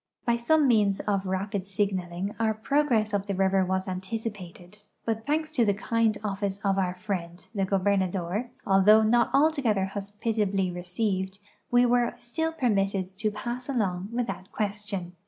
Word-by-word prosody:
By 235 - +3
some 285 +5 +3
means 210 -5 +3
of 195 -2 -1
rapid 195 +1 -2
signaling 190 -1 -2
our 220 -1 +1
])rogress 225 -3 +1
up 200 0 -1
the 200 - -1
river 190 0 +3
was 190 +1 -1
anticipated, 190 -1 -6 0.3
but 225 +2 -2
thanks 310 +1 0
to 255 -7 +2
the 205 -3 +2
kind 225 0 +1
office 200 -1 -2
of 195 -1 +2
our 180 -1 0
friend, 180 -3 -5
the 195 -3 0
gobernador, 190 +2 0 0.2
although 205 +3 +6
not 235 +2 +3
altogether 275 -10 +3
hospitably 200 -1 -1
received, 190 +2 -2 0.3
we 245 0 +5
were 245 0 +2
still 320 +7 -2
permitted 195 - 0
to 215 -1 +1
pass 240 +5 -5
along 195 -7 -1
without 235 -5 -3
question. 205 -4 -3
205 Hz, 150 wpm, -27 LUFS, 190-230 Hz, 0.3 s, although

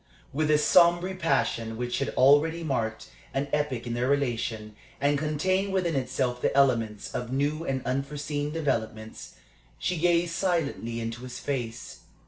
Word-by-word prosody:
With 155 +2 0
a 150 - +5
sombre 175 +4 +4
passion 135 -10 0
which 125 +2 -2 0.2
already 150 +5 +5
marked 115 -7 -2 0.2
an 140 +1 0
epoch 145 -5 0
in 120 - -3
their 120 +1 0
relation, 115 -6 -1 0.2
and 145 +1 +2
contained 185 +7 0
within 175 -4 +1
itself 125 -1 -1
the - - +1
elements 115 -6 +2
of 125 0 -4
new 145 +4 0
and 130 -1 -2
unforeseen 145 +2 -2
developments, 110 -8 -3 0.4
she 180 - -1
gazed 170 0 +2
silently 165 -11 -1
into 115 +1 -4
his 125 -1 -7
face. 120 -5 -4
140 Hz, 140 wpm, -27 LUFS, 120-155 Hz, 0.4 s, a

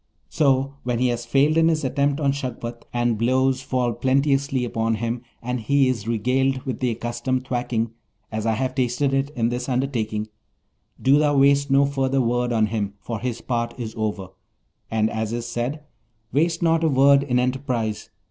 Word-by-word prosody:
So, 140 -2 +1
when 125 -1 -1
he 125 +1 +2
has 120 0 -3
failed 140 +5 +3
in 165 0 +5
his 160 -2 +1
attempt 140 +2 0
on 140 -2 +2
Shagpat, 120 -3 -5
and 120 -2 0
blows 130 +2 +2
fall 125 -3 -1
plenteously 135 0 +1
upon 115 -1 0
him, 115 +2 -3 0.2
and 125 +1 -2
he 135 +4 +2
is 115 -4 -3
regaled 130 +4 +1
with 130 - -4
the 125 - +1
accustomed 120 +3 -2
thwacking, 120 -3 -1 0.4
as 110 0 -2
I 115 - +3
have 130 +3 -1
tasted 130 +2 0
it 135 +1 +1
in 115 -2 +1
this 125 +2 -3
undertaking, 115 -5 -1 0.7
do 140 +2 +4
thou 145 -1 +2
waste 140 +1 +4
no 135 +1 +5
further 135 -1 0
word 120 0 +1
on 110 -2 +3
him, 105 -2 -3
for 115 0 -5
his 120 0 -3
part 120 -1 -2
is 110 -2 -5
over, 105 -4 -3 0.6
and 110 -1 +1
as 110 0 -3
is 120 0 -3
said: 120 +5 -3 0.5
"Waste 165 +4 +1
not 165 0 +3
a - - +4
word 140 0 +5
in 130 -3 0
enterprise! 125 -4 -1
125 Hz, 180 wpm, -23 LUFS, 115-135 Hz, 0.7 s, in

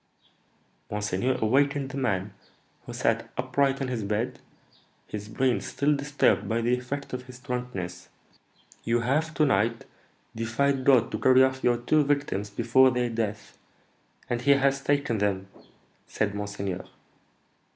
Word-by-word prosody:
Monseigneur 105 +5 -1
awakened 140 +3 +2
the 140 - -6
man, 100 -6 -1 0.5
who - - -6
sat - - 0
upright 135 -1 +1
in 135 - -1
his 120 -4 -3
bed, 110 +5 -2 0.7
his 105 0 -7
brain 130 +2 +1
still 145 +1 0
disturbed 145 +1 +1
by 115 +1 +1
the 120 +2 +2
effect 135 +3 -6
of 125 0 -5
his 125 -1 -11
drunkenness. 125 -9 -5 0.7
'You 115 +1 +1
have 150 +7 0
to 155 - +3
night 115 -1 +1 0.5
defied 130 +4 0
God 130 -5 +4
to - - -3
carry 130 0 +6
off 130 0 0
your 120 -1 +3
two 150 +6 +2
victims 140 -8 -1
before 120 +5 +4
their 125 -1 -1
death, 110 -2 -4 0.7
and 120 0 -2
he 140 +3 +5
has 140 0 +1
taken 140 -6 +1
them,' 95 -2 -1 0.6
said 105 -2 -1
monseigneur. 100 -2 -4
125 Hz, 140 wpm, -27 LUFS, 105-135 Hz, 0.7 s, carry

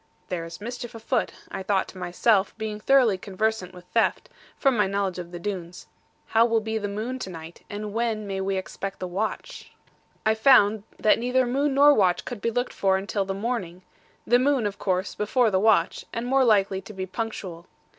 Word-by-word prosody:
'There 170 -2 -3
is 165 - -9
mischief 240 +2 -6
afoot,' 225 +1 -1 0.2
thought 190 0 -6
I - - 0
to - - -13
myself, 190 +4 +1
being 215 -1 -4
thoroughly 235 -5 +4
conversant 200 -1 -2
with 180 -1 -13
theft, 230 - +1 0.3
from 270 -3 +3
my 210 -3 +3
knowledge 195 -2 -1
of 175 -1 -7
the 175 - -6
Doones; 180 -2 -5 0.4
'how 225 +1 +4
will 230 -1 +3
be 220 0 -3
the 205 - -3
moon 220 +6 -4
to 190 - -5
night, 165 -1 -10
and 205 0 -5
when 225 -2 -1
may 195 -1 -3
we 195 0 -1
expect 195 +1 -5
the 185 - -4
watch?' 200 +5 -4 0.5
I 220 - +4
found 220 -3 +5
that 215 - +3
neither 250 +2 +2
moon 275 +3 0
nor 290 +1 +7
watch 185 -7 +2
could 240 -5 -6
be 230 - +1
looked 245 +2 -2
for 190 -1 +2
until 200 +1 -2
the 195 0 -3
morning; 195 -5 -3 0.4
the 245 +1 +4
moon, 265 -3 +2
of 205 -1 -3
course, 185 -1 -1
before 220 +2 +1
the 190 - +2
watch, 200 -5 +3
and 230 +1 -3
more 265 +2 +3
likely 195 -4 +3
to 215 - -11
be 190 -1 -4
punctual. 185 -4 -5
210 Hz, 200 wpm, -25 LUFS, 190-230 Hz, 0.5 s, nor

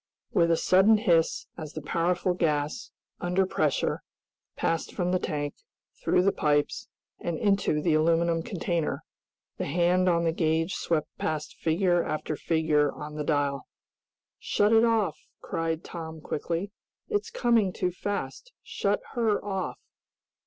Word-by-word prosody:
With 170 -1 +4
a 165 - +4
sudden 195 +6 +5
hiss, 170 -7 +2
as 155 -1 -7
the 155 - -5
powerful 175 +4 +1
gas, 155 +2 -1 0.3
under 180 +2 +1
pressure, - - 0 0.5
passed 165 0 -1
from 180 -1 0
the 185 - +2
tank, 145 -3 -2 0.5
through 180 - +3
the 195 - +4
pipes, 145 -3 0 0.3
and 170 -2 -3
into 195 -7 +1
the 165 - +3
aluminum 165 +1 +3
container, 170 -2 -2 0.6
the - - -2
hand 180 +1 +3
on 170 -1 +2
the 165 - +2
gauge 160 +2 0
swept 160 -3 -1
past 155 -1 -3
figure 175 +1 +2
after 155 0 -3
figure 155 -2 +2
on 150 0 -8
the 150 0 -3
dial. 145 -2 0 0.7
"Shut 205 +2 +2
it 225 0 +6
off!" 210 -9 +1 0.2
cried 165 0 -2
Tom 160 -2 -7
quickly. 170 +6 -3 0.4
"It's 420 +1 -1
coming 235 - +2
too 180 0 -1
fast! 205 - -4
Shut - - -1
her 225 -5 +1
off!" 195 -2 -3
170 Hz, 140 wpm, -27 LUFS, 155-190 Hz, 0.7 s, it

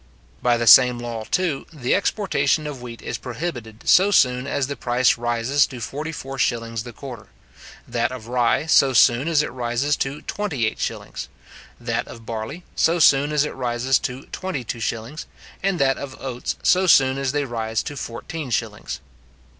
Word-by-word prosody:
By 120 -1 +3
the 115 - -1
same 125 +3 +8
law, 120 -2 -5
too, 170 -7 -1
the 135 -6 -1
exportation 160 -7 +1
of 145 -4 -6
wheat 120 -1 -9
is - - -4
prohibited 120 -4 -6
so 190 +3 +6
soon 125 -8 +3
as 140 -1 0
the 140 +2 -5
price 125 -1 +2
rises 120 +4 +1
to 125 - -9
forty 150 +7 -4
four 135 -3 -7
shillings 115 -2 -1
the 120 +2 -8
quarter; 120 -2 -9 0.6
that 120 0 -1
of 125 -4 -8
rye 120 +4 +1
so 140 -4 +4
soon 120 +4 +4
as 155 -3 +3
it - - -4
rises 125 +4 0
to 140 +2 -3
twenty 170 - -2
eight 110 - -2
shillings; - - -5 0.5
that 120 -1 -2
of 115 -1 -11
barley 115 +10 -5
so 165 +2 +3
soon 145 -2 +5
as 150 -1 +2
it - - -5
rises 125 0 0
to 130 +2 -5
twenty 185 -9 -4
two 120 - -5
shillings; 115 +7 -4 0.3
and 195 -1 0
that 135 -3 +2
of 135 -2 -8
oats 125 -2 -4
so 185 +1 +4
soon 135 -4 +5
as 135 -1 0
they 145 0 -1
rise 115 -3 -2
to 145 - -6
fourteen 135 +4 -6
shillings. 110 - -3
130 Hz, 180 wpm, -22 LUFS, 120-145 Hz, 0.6 s, same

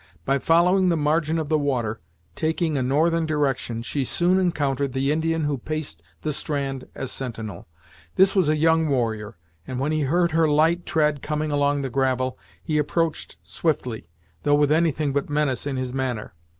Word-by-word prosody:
By 135 +1 +2
following 180 +5 +4
the 170 - +2
margin 155 +2 +1
of 160 -2 -2
the 155 -1 +2
water, 120 -6 -1 0.3
taking 160 0 0
a 135 - +1
northern 160 +5 +2
direction, 135 -6 -1
she 135 +3 -2
soon 175 +8 +2
encountered 140 -7 0
the 135 +1 +1
Indian 160 +1 0
who 145 -3 -1
paced 155 - -5 0.2
the 150 - -1
strand 140 -2 -3
as 135 - -4
sentinel. 115 -8 -6 0.5
This 190 +1 +4
was 185 -6 +3
a 155 - +3
young 160 +1 +3
warrior, 110 -6 -1 0.3
and 130 -1 -4
when 140 +3 0
he 155 0 0
heard 170 +5 +2
her 160 0 +3
light 160 +4 +2
tread 150 -3 +1
coming 150 0 -2
along 145 0 +1
the 135 - -2
gravel 130 -1 0 0.2
he 155 -1 0
approached 160 +2 -1
swiftly, 125 - -2 0.3
though 145 - +3
with 145 0 +3
anything 155 -3 +1
but 140 +1 -1
menace 145 -3 0
in 135 -2 -2
his 130 -1 -3
manner. 125 -7 -3
145 Hz, 175 wpm, -24 LUFS, 130-160 Hz, 0.5 s, following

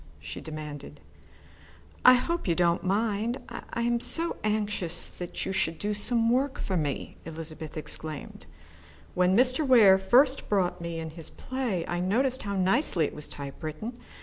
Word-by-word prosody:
she - - -7
demanded. 155 -2 -8 1.0
"I 255 - +9
hope 335 +5 -1
you 170 - +2
don't 170 0 +2
mind 215 +4 0
I 235 - -5
am 240 0 +2
so 335 +7 0
anxious 205 -5 -1
that 175 -1 -6
you - - -2
should 165 -3 0
do 210 +4 -2
some 230 +2 +2
work 265 +2 +1
for 190 - -2
me," 145 -5 -2
Elizabeth 160 -1 -7
explained. 155 0 -6 0.7
"When 180 +2 +3
Mr. 255 +4 +3
Ware 220 -8 +7
first 255 +8 +3
brought 180 -3 +1
me 170 -1 -4
in 160 -1 -5
his 165 0 -7
play, 245 -10 -3
I 175 - -2
noticed 245 +8 +1
how 200 -1 -3
nicely 190 - +3
it - - -4
was 150 - -6
typewritten. 155 - -6
190 Hz, 155 wpm, -28 LUFS, 165-240 Hz, 1.0 s, I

